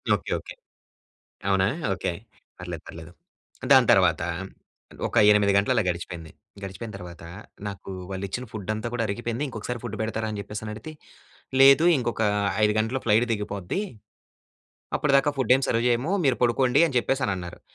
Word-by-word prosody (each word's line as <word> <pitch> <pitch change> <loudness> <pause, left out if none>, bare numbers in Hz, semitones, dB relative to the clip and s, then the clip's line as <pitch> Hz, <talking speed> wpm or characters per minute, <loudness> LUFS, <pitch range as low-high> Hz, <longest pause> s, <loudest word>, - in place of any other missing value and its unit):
Okay. - - -6
Okay. - - -10 1.0
అవునా 95 0 +3 0.3
okay. 90 - -2 0.5
పర్లేదు, - - -7
పర్లేదు 80 +1 -10 0.6
దాని 130 -3 +7
తర్వాత 90 -5 +4 0.9
ఒక - - -8 0.2
8 105 -1 +4
గంటలు 100 - +2
అలా - - +2
గడిచిపేంది. 85 -2 -5 0.3
గడిచిపోయిన 100 +3 -7
తర్వాత 90 -3 -10 0.4
నాకు 100 -1 -7 0.2
వాళ్ళు 95 +1 -4
ఇచ్చిన 125 +6 -5
ఫుడంతా 110 +2 -4
కూడా 120 - 0
అరిగిపేయింది. 120 +6 -3
ఇంకొకసారి 120 +1 -5
ఫుడ్ 110 -3 -5
పెడతారా? 110 0 -2
అని 105 - -5
జెప్పేసని 105 +1 -6
అడిగితే. 110 +9 -8 0.7
లేదు 140 +4 +7
ఇంకొక 120 -3 -2 0.4
5 105 0 +4
గంటలు 120 +4 -1
ఫ్లైట్ 110 +2 +4
దిగిపోద్ది. 105 - -3 1.2
అప్పటిదాకా 140 0 +3
ఫుడేం 130 +1 +3
సర్వ్ 115 +1 +1
చేయము. 125 +9 +1
మీరు 130 -3 +2
పడుకోండి 125 +4 +3
అని 135 - -4
జెప్పేసని 130 -4 0
అన్నారు. 90 -1 -8
110 Hz, 140 wpm, -25 LUFS, 100-125 Hz, 1.2 s, దాని